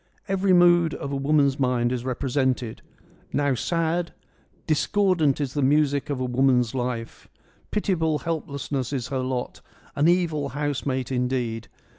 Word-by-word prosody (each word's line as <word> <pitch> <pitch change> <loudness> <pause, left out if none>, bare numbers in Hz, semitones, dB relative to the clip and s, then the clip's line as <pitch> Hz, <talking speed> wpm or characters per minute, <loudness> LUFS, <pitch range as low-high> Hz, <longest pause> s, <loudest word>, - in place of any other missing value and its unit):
Every 195 0 +1
mood 175 -2 +5
of 140 - -5
a - - -1
woman's 140 0 +2
mind 125 -2 +1
is 125 -2 -2
represented: 130 -2 -1 0.5
now 145 -1 +1
sad 165 +6 -1 0.2
— - - -36
' - - -37
Discordant 170 -4 +2
is 140 -3 -2
the 145 - -1
music 145 +1 +2
of 140 -3 -2
a 130 - -1
woman's 125 -2 +2
life: 120 -3 -4 0.4
pitiable 160 -7 0
helplessness 140 -5 -3
is 130 -3 -3
her 135 -2 -2
lot, 130 -1 -3 0.3
an 145 +3 +3
evil 165 -5 +1
housemate, 135 -3 -2
indeed. 125 -3 -1
140 Hz, 145 wpm, -24 LUFS, 125-160 Hz, 0.5 s, mood